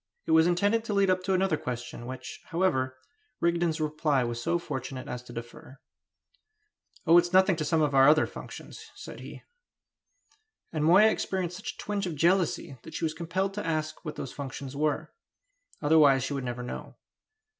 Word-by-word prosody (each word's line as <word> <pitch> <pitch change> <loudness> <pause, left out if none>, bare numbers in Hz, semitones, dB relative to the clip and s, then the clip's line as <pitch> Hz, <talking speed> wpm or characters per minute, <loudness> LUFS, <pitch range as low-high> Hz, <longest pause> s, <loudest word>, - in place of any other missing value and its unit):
It - - -2
was 160 +1 +6
intended 205 +6 +2
to 210 - -2
lead 195 -1 +4
up 185 0 +1
to 190 - +2
another 185 -4 +2
question, 120 -2 -6
which, 130 0 -8
however, 135 -8 0 0.4
Rigden's 170 -1 +1
reply 150 -3 +1
was 120 0 -3
so 170 +8 +1
fortunate 130 -5 -5
as 125 - -5
to 125 - -13
defer. 120 +3 -9 1.3
"Oh, 170 0 +7
it's 175 +1 -1
nothing 190 0 +5
to 155 - -1
some 160 0 +2
of 145 -1 0
our 135 +1 +7
other 155 +1 +5
functions," - - -10
said - - -9
he. - - -10 1.3
And 155 -1 0
Moya 200 +7 +7
experienced 180 -4 -2
such 240 +6 -5
a - - -28
twinge 205 -2 -2
of 165 - -4
jealousy 170 -5 +1
that 160 - -11
she - - -1
was 155 - -1
compelled 180 +4 -2
to 210 - -4
ask 155 -1 -2
what 155 -3 -5
those 135 - -6
functions 140 -1 -6
were; 150 0 -1 0.7
otherwise 145 -3 +5
she 140 - -3
would 135 -2 -3
never 125 0 -4
know. 125 - -7
155 Hz, 180 wpm, -28 LUFS, 135-180 Hz, 1.3 s, Oh